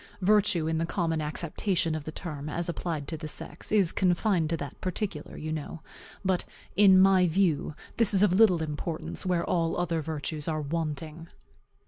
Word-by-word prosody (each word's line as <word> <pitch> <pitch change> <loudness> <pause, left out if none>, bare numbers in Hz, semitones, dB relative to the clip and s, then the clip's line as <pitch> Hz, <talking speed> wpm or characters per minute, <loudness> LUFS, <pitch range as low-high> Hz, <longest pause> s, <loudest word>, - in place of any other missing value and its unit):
Virtue, 200 -4 +4
in 160 0 0
the 165 - 0
common 165 -4 -1
acceptation 165 +3 -1
of 155 -2 -4
the 155 - -5
term, 155 -4 -6
as 170 +3 -2
applied 165 -4 -3
to 165 - -4
the 155 0 -6
sex, - - -7
is 200 -5 +4
confined 180 -2 +1
to 165 - 0
that 145 -3 -8
particular, 185 -4 -4
you 155 0 -5
know. 155 +1 -6 0.4
But 185 -1 +1 0.3
in 195 -2 +7
my 190 -1 +5
view, 165 -3 +1 0.2
this 230 -3 +4
is 195 -1 +4
of 200 -4 +4
little 185 -5 +5
importance 155 +4 -4
where 175 -2 +1
all 165 -2 0
other 170 -2 -1
virtues 155 0 -4
are 155 -1 -1
wanting. 155 +1 -4
165 Hz, 175 wpm, -28 LUFS, 155-185 Hz, 0.4 s, in